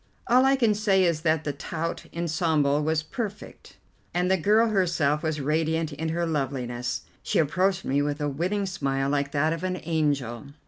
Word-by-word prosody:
All 255 Hz, +2 st, +5 dB
I 270 Hz, 0 st, +5 dB
can 230 Hz, -5 st, +3 dB
say 200 Hz, -2 st, +2 dB
is 170 Hz, -3 st, +1 dB
that 155 Hz, -1 st, +1 dB
the 145 Hz, -, -2 dB
tout 165 Hz, +4 st, -4 dB
ensemble 160 Hz, -3 st, +1 dB
was 155 Hz, +1 st, 0 dB
perfect, 210 Hz, +5 st, -7 dB, 0.4 s
and 180 Hz, +1 st, +1 dB
the -, -, +5 dB
girl 215 Hz, +6 st, +3 dB
herself 170 Hz, -7 st, +1 dB
was 155 Hz, -1 st, -2 dB
radiant 160 Hz, +2 st, 0 dB
in 160 Hz, +3 st, -3 dB
her 170 Hz, +1 st, -1 dB
loveliness. 125 Hz, -5 st, -2 dB, 0.2 s
She -, -, -1 dB
approached 185 Hz, +4 st, +1 dB
me 140 Hz, +2 st, +1 dB
with 145 Hz, +1 st, -1 dB
a 150 Hz, -, -1 dB
winning 180 Hz, +8 st, -1 dB
smile 135 Hz, -7 st, -1 dB
like 140 Hz, -1 st, 0 dB
that 155 Hz, +2 st, +2 dB
of 165 Hz, +1 st, -5 dB
an 185 Hz, -1 st, -2 dB
angel. 145 Hz, -7 st, -1 dB
160 Hz, 180 wpm, -26 LUFS, 145-185 Hz, 0.4 s, All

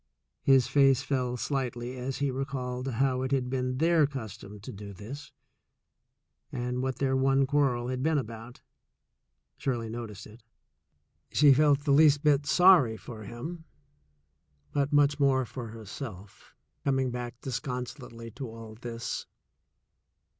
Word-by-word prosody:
His 135 Hz, -2 st, +5 dB
face 135 Hz, 0 st, +4 dB
fell 125 Hz, -3 st, -1 dB
slightly 125 Hz, -2 st, -3 dB
as 130 Hz, +1 st, -4 dB
he 140 Hz, -1 st, 0 dB
recalled 130 Hz, -1 st, -3 dB
how 130 Hz, +1 st, +1 dB
it 130 Hz, +1 st, -2 dB
had 130 Hz, -2 st, 0 dB
been 130 Hz, -1 st, -1 dB
their 160 Hz, 0 st, +4 dB
custom 105 Hz, -6 st, -8 dB
to -, -, -8 dB
do 100 Hz, 0 st, -9 dB
this, 130 Hz, +11 st, -9 dB, 1.2 s
and 125 Hz, +1 st, -2 dB
what 130 Hz, 0 st, -1 dB
their 135 Hz, -1 st, 0 dB
one 135 Hz, +1 st, +3 dB
quarrel 130 Hz, -4 st, +1 dB
had 130 Hz, 0 st, -2 dB
been 155 Hz, +2 st, +2 dB
about. 115 Hz, -1 st, -6 dB, 1.0 s
Shirley 120 Hz, -4 st, -2 dB
noticed 110 Hz, -3 st, -7 dB
it. 110 Hz, +3 st, -14 dB, 0.9 s
She 145 Hz, -1 st, +6 dB
felt 145 Hz, 0 st, +4 dB
the 145 Hz, -, +1 dB
least 145 Hz, 0 st, +5 dB
bit 145 Hz, -1 st, +3 dB
sorry 175 Hz, -12 st, +6 dB
for 110 Hz, +2 st, -9 dB
him, 160 Hz, -, -7 dB, 1.1 s
but 140 Hz, 0 st, 0 dB
much 145 Hz, 0 st, +4 dB
more 135 Hz, -2 st, +3 dB
for 120 Hz, 0 st, -7 dB
herself, 110 Hz, -2 st, -9 dB, 0.3 s
coming 135 Hz, -2 st, +1 dB
back 120 Hz, -1 st, -5 dB
so 135 Hz, -, -4 dB
disconsolately 125 Hz, -1 st, -5 dB
to 125 Hz, +2 st, -7 dB
all 115 Hz, -1 st, -10 dB
this. 115 Hz, +1 st, -5 dB
130 Hz, 140 wpm, -29 LUFS, 120-140 Hz, 1.2 s, She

